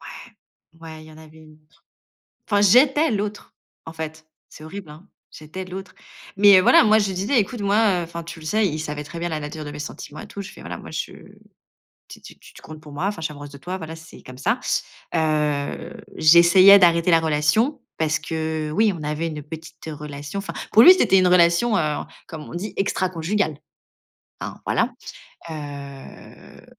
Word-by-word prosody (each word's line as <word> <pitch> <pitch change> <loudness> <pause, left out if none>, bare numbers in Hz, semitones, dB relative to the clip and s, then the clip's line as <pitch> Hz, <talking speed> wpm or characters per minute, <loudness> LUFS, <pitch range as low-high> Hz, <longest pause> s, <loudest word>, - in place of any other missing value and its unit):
ouais, - - -12 0.5
ouais 160 -1 -10
il - - -15
y - - -14
en 155 - -15
avait 160 0 -16
une 155 -1 -17
autre. 150 +1 -31 0.7
Enfin, 205 -1 +2
j'étais 270 - +5
l'autre, 210 -1 -4 0.3
en 160 - -9
fait, 160 0 -7 0.2
c'est 155 - -14
horrible, 170 +1 -9
hein. 155 +6 -14 0.2
J'étais 155 +5 -8
l'autre, 185 +1 -9 0.4
mais 200 -2 +7
voilà, 185 - +6
moi, 215 0 +5
je 210 - +2
lui - - -4
disais: 205 +8 +1
«Écoute, 220 +2 -3
moi, 200 -1 +2
heu, - - -3
enfin 170 0 -7
tu 170 0 -9
le 155 - -12
sais», 215 +3 +2
il 155 -3 -4
savait 150 -1 -5
très 165 +3 -9
bien 175 0 -3
la 155 - -3
nature 150 +1 -7
de 145 - -7
mes 145 - -9
sentiments 150 0 -8
et - - -10
tout. 200 - -8
Je 200 +1 -9
fais: - - -14
«Voilà, - - -7
moi, - - -11
je - - -4 1.0
t - - -13
t - - -13
tu - - -18
t - - -15
comptes 155 -1 -11
pour 150 - -13
moi, 160 +7 -2
enfin 205 -5 -4
je 160 - -4
suis - - -2
amoureuse 145 -1 -10
de 140 - -12
toi. 180 +5 -6
Voilà, 160 0 -7
c'est 165 0 -14
comme 130 0 -12
ça». - - 0 0.6
Heu, 150 -3 -1 0.2
j'essayais 170 +5 +7
d'arrêter 170 -2 +4
la 165 -2 +5
relation 165 - +1 0.2
parce 160 0 0
que 160 -1 -3
oui, 210 +5 +2
on 165 - -9
avait 150 +2 -3
une 155 -2 -6
petite 160 +2 -11
relation. 145 +2 -7
Enfin 195 - -5 0.2
pour 225 - +7
lui, 365 - +11
c'était 195 - +3
une 185 -1 +4
relation, 180 +5 +4
heu, 150 -2 0 0.3
comme 155 -2 -8
on - - -11
dit 185 +5 -5
«extraconjugale», 185 -3 -1 0.8
hein, - - -6
voilà, - - 0 0.6
heu. 140 -3 -10
165 Hz, 205 wpm, -22 LUFS, 155-195 Hz, 1.0 s, lui